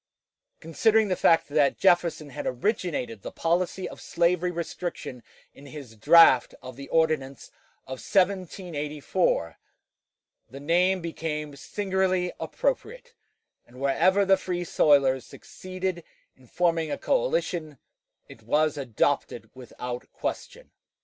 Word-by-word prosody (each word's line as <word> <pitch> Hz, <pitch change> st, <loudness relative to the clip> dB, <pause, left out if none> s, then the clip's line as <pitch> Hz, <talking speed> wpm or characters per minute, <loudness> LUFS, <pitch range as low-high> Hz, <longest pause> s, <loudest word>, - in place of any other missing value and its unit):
Considering 215 Hz, +6 st, +2 dB
the 185 Hz, -, +1 dB
fact 165 Hz, -1 st, +3 dB
that 145 Hz, -1 st, +2 dB
Jefferson 170 Hz, -5 st, +2 dB
had -, -, -5 dB
originated 130 Hz, -, -2 dB
the -, -, -7 dB
policy 180 Hz, +2 st, -1 dB
of -, -, -11 dB
slavery 175 Hz, +1 st, +1 dB
restriction 170 Hz, -6 st, -5 dB, 0.3 s
in 140 Hz, -, -14 dB
his 140 Hz, -5 st, -10 dB
draft 130 Hz, +3 st, +6 dB
of 130 Hz, -1 st, -10 dB
the 140 Hz, +1 st, -10 dB
ordinance 155 Hz, -5 st, 0 dB, 0.3 s
of 130 Hz, -1 st, -7 dB
1784, 175 Hz, -, -1 dB, 0.9 s
the 135 Hz, +4 st, -10 dB
name 180 Hz, +5 st, +2 dB
became 150 Hz, -3 st, -5 dB
singularly 185 Hz, +2 st, -1 dB
appropriate, -, -, -3 dB, 0.5 s
and 125 Hz, +1 st, -15 dB
wherever 180 Hz, +9 st, +2 dB
the 195 Hz, 0 st, +4 dB
Free 180 Hz, -1 st, -3 dB
soilers 140 Hz, -5 st, +3 dB
succeeded 185 Hz, -1 st, -6 dB, 0.3 s
in 130 Hz, -1 st, -22 dB
forming 165 Hz, +1 st, 0 dB
a -, -, -3 dB
coalition 480 Hz, -, -1 dB, 0.5 s
it 115 Hz, -, -14 dB
was 150 Hz, +6 st, +1 dB
adopted 125 Hz, -6 st, -1 dB
without 125 Hz, -1 st, -8 dB
question. -, -, -6 dB
165 Hz, 115 wpm, -26 LUFS, 140-185 Hz, 0.9 s, draft